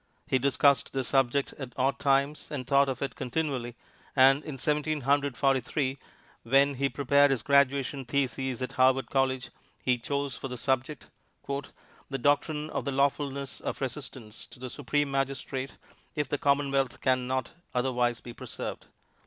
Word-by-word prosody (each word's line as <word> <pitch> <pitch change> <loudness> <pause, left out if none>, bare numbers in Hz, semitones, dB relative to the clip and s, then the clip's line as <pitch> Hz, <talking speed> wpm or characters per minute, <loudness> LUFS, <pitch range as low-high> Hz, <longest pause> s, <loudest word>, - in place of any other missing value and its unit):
He 130 - +1
discussed 140 0 +3
the 135 -1 0
subject 135 +1 +1
at 130 -3 -6
odd 135 +1 +1
times 140 +1 +1
and 135 -4 -4
thought 140 +1 +4
of 135 0 -3
it 135 - -3
continually, 130 -3 -2 0.4
and, 135 +2 +6
in 145 -3 -6
Seventeen 150 +2 0
Hundred 140 -1 +1
Forty 135 -1 +3
three, 135 +2 -2 0.4
when 135 +4 +4
he 140 +1 0
prepared 140 +1 +4
his 130 -6 0
graduation 140 -1 +2
thesis 130 -1 -1
at 125 - -3
Harvard 130 -1 +3
College 130 -1 0 0.3
he 125 -1 +2
chose 140 +2 -2
for 135 - -6
his 125 -1 -5
subject, 130 +2 -1 0.4
"The 140 0 -7
Doctrine 150 +3 +1
of - - -2
the 140 - -1
Lawfulness 140 0 -1
of - - -4
Resistance 130 -4 -6
to - - -14
the 125 0 -7
Supreme 145 0 -1
Magistrate 135 0 -2 0.4
if 150 -3 -1
the 145 - -2
Commonwealth 140 -2 +1
Can 130 -1 +1
Not 130 -1 -1 0.2
Otherwise 125 -2 +1
be 120 - -9
Preserved." - - -6
135 Hz, 160 wpm, -29 LUFS, 130-140 Hz, 0.4 s, and